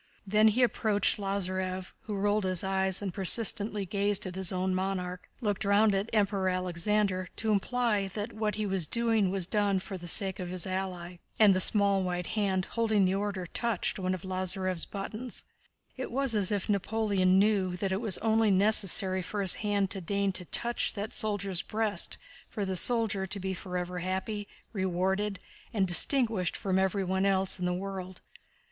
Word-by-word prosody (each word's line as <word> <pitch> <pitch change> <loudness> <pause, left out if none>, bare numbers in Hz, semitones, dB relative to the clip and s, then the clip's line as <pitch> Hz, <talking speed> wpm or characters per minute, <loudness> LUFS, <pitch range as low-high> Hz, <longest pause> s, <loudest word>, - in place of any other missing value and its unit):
Then 215 +2 +4
he 230 +4 +3
approached 215 -4 +1
Lázarev 185 -1 -3
(who 215 -2 -4
rolled 205 +1 +1
his 185 -1 0
eyes 190 0 +1
and 190 -3 -3
persistently 205 +1 +3
gazed 200 +1 0
at 185 - -5
his 190 -1 -1
own 185 0 -1
monarch), 185 -1 -3
looked 205 -4 -1
round 205 +1 +3
at 195 +2 -1
the 230 - -5
Emperor 200 -2 +1
Alexander 185 +1 0
to 220 -1 -1
imply 210 -1 0
that 210 +2 -4
what 215 -2 -2
he 215 0 -2
was 190 -5 -1
now - - -12
doing 225 -4 +2
was 190 -1 -1
done 200 +1 +1
for 190 0 -6
the 175 - -9
sake 190 +2 +1
of 180 -1 -5
his 180 -1 -3
ally, 185 -2 -4 0.2
and 210 -3 +6
the 185 - +1
small 200 0 +4
white 180 -1 -2
hand 195 -3 -1
holding 220 -4 +1
the 185 - +1
Order 195 -2 -2
touched 225 +2 -1
one 185 0 -1
of 180 - -10
Lázarev's 185 -1 -1
buttons. 215 +5 -5 0.5
It 260 - -5
was 270 0 +2
as 205 -3 +2
if 200 -3 -1
Napoleon 200 -2 +1
knew 195 -3 +2
that 195 0 -2
it 190 +3 -1
was 215 -6 +1
only 225 -1 +3
necessary 195 -1 +4
for 205 +3 -5
his 190 -3 +3
hand 205 -2 0
to 195 - -2
deign 200 +2 0
to 185 -1 -6
touch 235 +7 -1
that 205 +1 -5
soldier's 200 -4 0
breast 215 -4 -1 0.3
for 205 -3 -3
the 190 -1 -2
soldier 210 -2 +2
to 200 +2 -4
be 190 0 -3
forever 180 -1 -4
happy, 190 +3 -3 0.3
rewarded, 190 +1 -1 0.3
and 200 -5 +1
distinguished 220 0 +3
from 190 -1 0
everyone 190 0 0
else 190 -1 +1
in 180 - -2
the 180 - 0
world. 185 -1 -6
195 Hz, 180 wpm, -29 LUFS, 185-210 Hz, 0.5 s, and